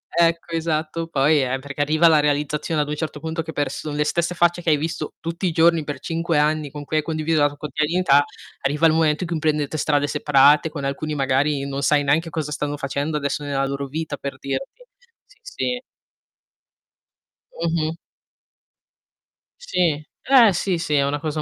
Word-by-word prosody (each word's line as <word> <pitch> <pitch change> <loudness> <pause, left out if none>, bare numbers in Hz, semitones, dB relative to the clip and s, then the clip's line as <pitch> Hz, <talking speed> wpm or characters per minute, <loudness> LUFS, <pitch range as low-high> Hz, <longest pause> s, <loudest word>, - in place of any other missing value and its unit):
Ecco, 170 0 +2
esatto, 165 0 -2
poi 145 -1 +3
eh, 130 +1 -1
perché 140 +1 -6
arriva 155 +3 +4
la 155 -2 +5
realizzazione 150 +1 0
ad 145 - -2
un 150 - -2
certo 155 -1 -4
punto 160 +2 -3
che 160 0 -7
pers 145 -3 -2
son 150 -1 -5
le 150 - +2
stesse 170 +3 -1
facce 175 0 +2
che 170 - -1
hai 150 - +4
visto 155 0 -4
tutti 170 +3 -3
i 170 - 0
giorni 165 0 +3
per 145 0 -5
5 165 -1 -1
anni, 150 0 +1
con 145 -1 -7
cui 155 - -1
hai 155 - +1
condiviso 155 0 0
la 145 - +5
tu 145 - -13
quotidianità, 150 +1 +2 0.4
arriva 150 +4 +1
il 155 - +3
momento 160 +1 +2
in 170 - -5
cui 165 - -1
prendete 150 -1 0
strade 145 -1 +1
separate. 145 +1 +4
Con 150 -3 -6
alcuni 150 +2 -3
magari, 140 +1 +1
non 140 0 -3
sai 145 +1 +3
neanche 155 +4 +1
cosa 150 -1 -4
stanno 145 0 -3
facendo 140 +3 -2
adesso 145 0 -2
nella 135 -1 -1
loro 140 0 -3
vita, 150 0 -4
per 140 - -6
dirti. 270 - -5 0.4
Sì, - - -25
sì. 250 - -3 1.8
Mh-mh. 165 -1 0 1.7
Sì, 170 - 0 0.2
eh 245 -6 +6
sì, 180 0 0
sì, 165 -2 -3
è 140 -1 +3
una 145 +1 -1
cosa 155 +1 -3
150 Hz, 190 wpm, -22 LUFS, 145-165 Hz, 1.8 s, eh